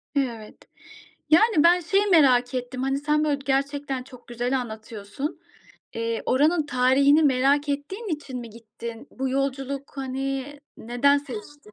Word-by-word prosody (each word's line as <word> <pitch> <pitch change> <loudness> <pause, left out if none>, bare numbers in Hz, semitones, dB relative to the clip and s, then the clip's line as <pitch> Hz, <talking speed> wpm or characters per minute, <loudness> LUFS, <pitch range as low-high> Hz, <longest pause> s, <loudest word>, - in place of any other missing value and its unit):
Evet. 235 -6 -2 0.7
Yani 330 0 +5
ben 350 +1 +6
şeyi 390 +4 +1
merak 260 -8 +4
ettim. 255 0 -4
Hani 270 +1 0
sen 300 +1 +1
böyle 290 -2 0
gerçekten 275 -1 -1
çok 250 -1 -15
güzel 245 +2 -1
anlatıyorsun. 220 +3 -6 0.6
Eee, 230 0 -2
oranın 300 +4 +2
tarihini 275 +4 +4
merak 280 +1 +3
ettiğin 295 +11 -4
için 265 -4 -8
mi 235 -1 -9
gittin? 230 +1 -9
Bu 265 0 -3
yolculuk 275 +1 -3
hani 270 +1 -4 0.2
neden 245 +5 +2
seçtin? 280 -1 -10
270 Hz, 135 wpm, -24 LUFS, 245-290 Hz, 0.7 s, ben